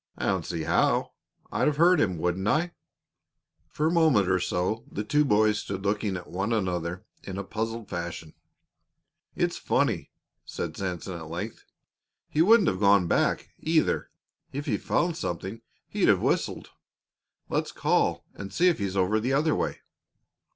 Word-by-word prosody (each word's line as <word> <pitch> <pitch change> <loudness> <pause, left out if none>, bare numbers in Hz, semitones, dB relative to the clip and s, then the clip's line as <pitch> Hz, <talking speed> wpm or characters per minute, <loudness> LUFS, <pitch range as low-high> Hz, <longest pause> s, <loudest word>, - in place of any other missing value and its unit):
"I - - -3
don't - - 0
see 80 -2 -3
how. 80 - +2 0.4
I'd - - +1
have 150 -1 +1
heard 175 +3 +5
him, 95 -5 +1
wouldn't 90 +4 -1
I?" 165 +8 +1 1.0
For 150 - -2
a 160 - +3
moment 155 - +4
or 95 0 +3
so 90 +5 -1
the 105 - -3
two 150 +7 +3
boys 105 -4 +3
stood 95 0 -5
looking 100 -1 0
at 90 - -8
one 100 +5 -3
another 90 -2 -1 0.2
in 95 -1 -7
a 100 - -3
puzzled 115 +2 -4
fashion. 85 -2 -5 1.0
"It's - - 0
funny," - - 0 0.3
Sanson 90 -3 -4
said 95 -2 -6
at 80 -1 -8
length. 90 +7 -6 0.6
"He 150 - +1
wouldn't 210 +1 +6
have 95 - -3
gone 100 -2 +5
back, - - +1
either. 160 0 +1 0.4
If 145 +2 -4
he 120 - +1
found 170 - 0
something, 95 - -4 0.3
he'd - - +1
have - - +5
whistled. - - -1 0.8
Let's - - -1
call - - +1
and 100 0 -8
see 175 - +4
if 170 - 0
he's 100 -1 -2
over 95 +4 +2
the 125 +5 -1
other 150 +3 +3
way." - - -2
105 Hz, 165 wpm, -27 LUFS, 90-145 Hz, 1.0 s, wouldn't